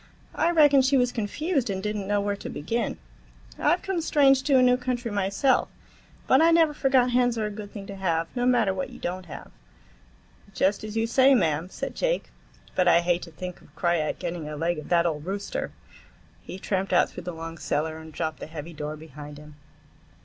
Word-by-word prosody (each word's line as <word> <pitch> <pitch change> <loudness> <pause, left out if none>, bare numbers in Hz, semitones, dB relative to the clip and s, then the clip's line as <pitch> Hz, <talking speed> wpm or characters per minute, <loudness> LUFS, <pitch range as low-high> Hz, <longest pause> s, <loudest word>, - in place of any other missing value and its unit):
I 330 - +1
reckon 295 -5 +6
she 270 +1 +3
was 250 -1 +2
confused 260 - -1
and 190 -1 -3
did 210 0 -2
n't 200 -2 -4
know 205 0 +1
where 200 0 -1
to - - -8
begin. 225 +11 -2 0.6
I've - - +2
come 380 -3 -1
strange 275 -4 +4
to 275 -1 +3
a - - +5
new 250 0 +5
country 250 -2 -3
myself, 200 +6 +1 0.6
but 260 - +5
I 330 - +6
never 330 -2 +4
forgot 265 -3 +2
hens 245 -1 +2
are 220 - 0
a 210 - -3
good 205 -1 -8
thing 200 -2 -8
to 200 - -8
have, 165 -4 0
no 245 0 +1
matter 235 -6 +3
what 185 -1 -4
you - - -11
don't 180 0 -5
have." - - -10 1.0
"Just 195 +2 +1
as 215 +1 -5
you 225 - +2
say, 265 +3 +5
mam," 160 -4 +1
said - - -5
Jake, - - -1 0.4
"but 180 - +2
I 170 0 +6
hate 175 0 +1
to 170 - -9
think 180 +2 -7
of - - -21
Krajiek 170 -3 0
getting 170 -3 -5
a 150 - -6
leg 165 +1 -1
of 150 - -10
that 170 -1 +3
old 150 -3 -1
rooster." 200 +4 -4 0.7
He - - -8
tramped 190 0 -2
out - - +4
through - - -9
the 180 - -3
long 165 0 -7
cellar 160 +1 -2
and 160 0 -11
dropped 160 0 -3
the - - -7
heavy 160 +1 -8
door 150 0 -5
behind 150 -1 -10
him. 150 0 -13
200 Hz, 215 wpm, -26 LUFS, 165-250 Hz, 1.0 s, reckon